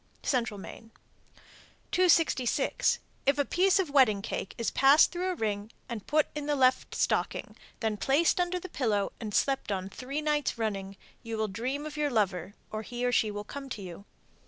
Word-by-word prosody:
Central 235 -6 0
Maine. 225 +3 -10 1.0
266. 330 -8 +3 0.3
If 275 0 +4
a 285 - +2
piece 380 +5 +3
of 365 -7 0
wedding 230 -8 +4
cake 195 - -4
is 230 - -1
passed 275 +3 +6
through 360 +1 -2
a 365 - -1
ring 210 -4 -2 0.2
and 225 -4 -6
put 305 0 +3
in 295 -1 -4
the 295 - +1
left 260 -1 +2
stocking, - - -1 0.3
then 220 -2 0
placed 290 - +2
under 355 0 0
the 370 - -7
pillow 220 - 0
and 220 -3 -5
slept 270 +1 +1
on 190 -1 -2
three 260 +8 -5
nights 295 -4 0
running, 200 -3 -3 0.2
you 230 -1 -5
will 220 0 0
dream 255 +9 -3
of 305 0 -7
your 300 -1 +1
lover, 195 - 0 0.2
or 215 - -3
he 245 +2 -4
or 245 - +2
she 225 -2 +2
will 205 0 -5
come 275 +5 -8
to 210 -6 -6
you. 185 +2 -9
245 Hz, 185 wpm, -29 LUFS, 210-295 Hz, 1.0 s, passed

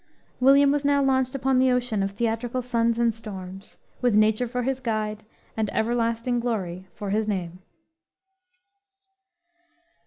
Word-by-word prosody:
William 275 +2 +6
was 290 0 0
now 285 0 +3
launched 260 0 +1
upon 265 -1 +1
the 260 0 +4
ocean 245 -4 0
of 195 - 0
theatrical 230 +4 -2
suns 235 -1 +1
and 235 -1 +2
storms, 195 -3 -9 0.2
with 245 -4 +2
Nature 215 +3 +3
for 250 +1 -3
his 265 +1 -1
guide 215 -3 -3 0.3
and 220 -2 -1
everlasting 230 +1 0
glory 190 -6 -3
for 205 -2 -5
his 215 +1 0
name. 180 -4 -3
230 Hz, 135 wpm, -25 LUFS, 215-255 Hz, 0.3 s, William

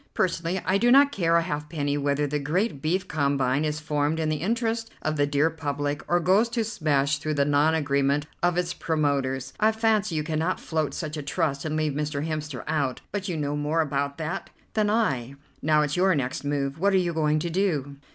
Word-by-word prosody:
Personally 175 0 0
I 190 +2 +2
do 240 +3 +3
not 280 +2 +7
care 170 -8 +1
a 170 - +4
halfpenny 150 -2 -2
whether 145 0 0
the 145 +1 -1
great 155 +3 -1
beef 180 +5 0
combine 140 -2 +1
is 150 0 -1
formed 150 0 0
in 160 -1 0
the 155 - 0
interest 225 +3 -1
of 155 0 0
the 145 -1 +2
dear 145 +3 +2
public, 145 -1 -3
or 175 - +3
goes 195 +7 +3
to 230 -1 0
smash 150 -9 0
through 155 0 -2
the 140 -1 +2
non 145 +2 +3
agreement 140 -1 +1 0.2
of 175 0 +2
its 180 -1 0
promoters. 135 -4 -1
I 215 +1 +4
fancy 215 -4 +1
you 155 - 0
cannot 160 +3 -1
float 155 -2 -2
such 155 -1 -4
a - - -3
trust 145 -1 -1
and 155 0 -2
leave 155 -2 0
Mr. 150 0 -2
Hemster 155 -4 -4
out, 145 -5 -1
but 200 -1 -3
you 170 - -2
know 145 -1 -1
more 150 +3 +1
about 140 -1 -2
that 165 +4 -4 0.2
than 215 -1 +2
I. 140 - 0 0.3
Now 150 0 +3
it's 150 0 -1
your 185 0 +3
next 130 -1 -2
move. 140 0 -2
What 200 +2 +3
are - - +5
you 175 -2 +1
going 155 -1 +2
to 170 +2 -2
do?" 155 -7 -1
155 Hz, 210 wpm, -26 LUFS, 145-175 Hz, 0.3 s, not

